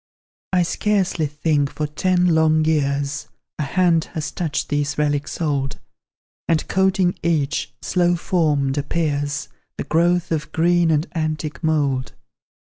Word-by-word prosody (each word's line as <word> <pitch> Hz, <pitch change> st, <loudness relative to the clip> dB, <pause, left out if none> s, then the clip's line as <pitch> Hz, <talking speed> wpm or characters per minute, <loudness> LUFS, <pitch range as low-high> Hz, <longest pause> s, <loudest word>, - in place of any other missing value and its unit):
I 180 Hz, -2 st, +3 dB
scarcely 185 Hz, -3 st, 0 dB
think, 150 Hz, -1 st, 0 dB
for 155 Hz, -, -3 dB
ten 180 Hz, +4 st, +1 dB
long 155 Hz, -1 st, +3 dB
years, 145 Hz, -2 st, 0 dB, 0.3 s
A -, -, 0 dB
hand 165 Hz, +2 st, +2 dB
has 155 Hz, -1 st, -3 dB
touched 160 Hz, -4 st, -2 dB
these 145 Hz, 0 st, -1 dB
relics 145 Hz, -1 st, -1 dB
old; 140 Hz, -4 st, -1 dB, 0.7 s
And, 165 Hz, -2 st, +1 dB
coating 190 Hz, -1 st, +1 dB
each, 145 Hz, -5 st, -1 dB
slow 175 Hz, -1 st, +2 dB
formed, 150 Hz, -6 st, +1 dB
appears 145 Hz, -1 st, -1 dB, 0.3 s
The -, -, -2 dB
growth 175 Hz, +2 st, +1 dB
of 155 Hz, -1 st, -2 dB
green 170 Hz, +1 st, +3 dB
and 155 Hz, 0 st, +2 dB
antique 155 Hz, -3 st, -3 dB
mould. 145 Hz, -5 st, 0 dB
155 Hz, 130 wpm, -21 LUFS, 145-170 Hz, 0.7 s, I